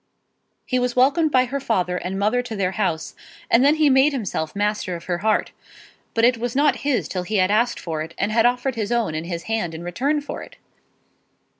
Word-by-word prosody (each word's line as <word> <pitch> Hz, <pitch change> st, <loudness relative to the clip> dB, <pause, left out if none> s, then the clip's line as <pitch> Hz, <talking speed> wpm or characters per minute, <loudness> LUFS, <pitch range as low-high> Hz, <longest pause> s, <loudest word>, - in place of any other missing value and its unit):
He 255 Hz, -, 0 dB
was 250 Hz, -1 st, -1 dB
welcomed 290 Hz, +5 st, +3 dB
by 255 Hz, -1 st, +4 dB
her 275 Hz, +3 st, -3 dB
father 185 Hz, -8 st, 0 dB
and 185 Hz, +2 st, -4 dB
mother 215 Hz, +5 st, +1 dB
to 245 Hz, -3 st, -6 dB
their 190 Hz, -2 st, 0 dB
house, 190 Hz, -6 st, -2 dB, 0.4 s
and 235 Hz, +2 st, +5 dB
then 290 Hz, +2 st, +5 dB
he 310 Hz, -1 st, +3 dB
made 270 Hz, +2 st, +4 dB
himself 195 Hz, -, -3 dB
master 205 Hz, -3 st, -1 dB
of 170 Hz, -, -8 dB
her 175 Hz, -1 st, -2 dB
heart. 215 Hz, +2 st, +1 dB, 0.6 s
But 230 Hz, 0 st, +4 dB
it 245 Hz, -1 st, +3 dB
was 240 Hz, +1 st, -3 dB
not 290 Hz, +2 st, +3 dB
his 280 Hz, -4 st, -1 dB
till 185 Hz, -, -3 dB
he 210 Hz, +5 st, -4 dB
had 185 Hz, 0 st, +3 dB
asked 235 Hz, +3 st, +1 dB
for 160 Hz, -3 st, -4 dB
it, 165 Hz, +2 st, -7 dB
and 200 Hz, +2 st, -1 dB
had 230 Hz, +2 st, +4 dB
offered 250 Hz, +2 st, 0 dB
his 225 Hz, -1 st, -3 dB
own 235 Hz, -9 st, 0 dB
and 160 Hz, +2 st, -4 dB
his 170 Hz, -2 st, -4 dB
hand 220 Hz, -7 st, -2 dB
in 165 Hz, -, -7 dB
return 265 Hz, -, 0 dB
for 290 Hz, -, -7 dB
it. -, -, -12 dB
225 Hz, 225 wpm, -22 LUFS, 185-255 Hz, 0.6 s, and